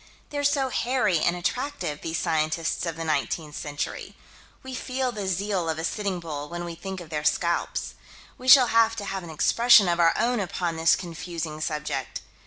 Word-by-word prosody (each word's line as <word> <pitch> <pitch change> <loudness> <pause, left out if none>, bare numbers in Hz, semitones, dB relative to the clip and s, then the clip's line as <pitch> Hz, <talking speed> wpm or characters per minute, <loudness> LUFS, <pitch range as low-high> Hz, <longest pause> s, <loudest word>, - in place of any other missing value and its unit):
They're 290 -1 -2
so 280 -2 +2
hairy 240 -9 +1
and 170 +3 +1
attractive, 180 - -3
these 165 0 -3
scientists 160 +2 -1
of 165 - -3
the 165 - -5
19th 155 0 -2
century. 145 -1 -5 0.5
We 260 0 -7
feel 255 0 -2
the 205 -4 -5
zeal 190 -2 -1
of 160 - -1
a 160 - -4
Sitting 195 0 -2
Bull 150 -3 -6
when 175 0 -5
we 170 - -5
think 190 +3 -6
of 170 -2 -11
their 150 -1 -2
scalps. 170 +3 0 0.4
We 255 - -10
shall 255 -2 +9
have 225 0 +4
to 205 - -5
have 195 -1 -3
an 170 - -10
expression 230 +6 +5
of 175 0 +1
our 165 -1 +4
own 240 0 +1
upon 175 -3 -2
this 165 0 +4
confusing 165 -3 -6
subject. 150 -4 -3
175 Hz, 190 wpm, -26 LUFS, 160-225 Hz, 0.5 s, shall